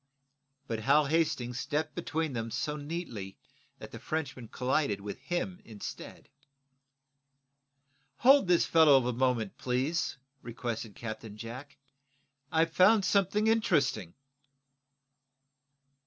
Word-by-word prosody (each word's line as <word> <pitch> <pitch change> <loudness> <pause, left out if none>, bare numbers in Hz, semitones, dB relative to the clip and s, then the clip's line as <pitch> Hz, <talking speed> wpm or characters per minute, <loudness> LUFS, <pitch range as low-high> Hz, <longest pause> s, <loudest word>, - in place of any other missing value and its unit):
But 115 -4 -3
Hal 140 +6 +4
Hastings 135 -6 0
stepped 150 +2 -2
between 160 -2 -2
them 115 -1 -3
so 150 +6 -2
neatly 145 - -6 0.4
that - - -10
the - - -8
Frenchman 135 -6 -4
collided 125 -3 0
with 100 +4 -7
him 175 +6 -3
instead. 105 -3 -9 1.9
"Hold 270 -3 +6
this 175 -1 +4
fellow 145 -6 +5
a 125 - 0
moment, 120 -4 0
please," 130 +7 -1 0.2
requested 115 -2 -5
Captain 110 -2 -7
Jack. 120 +6 -9 0.7
"I've 165 0 +2
found 195 +3 +5
something 200 +2 +2
interesting." 150 - +1
135 Hz, 105 wpm, -30 LUFS, 115-165 Hz, 1.9 s, Hold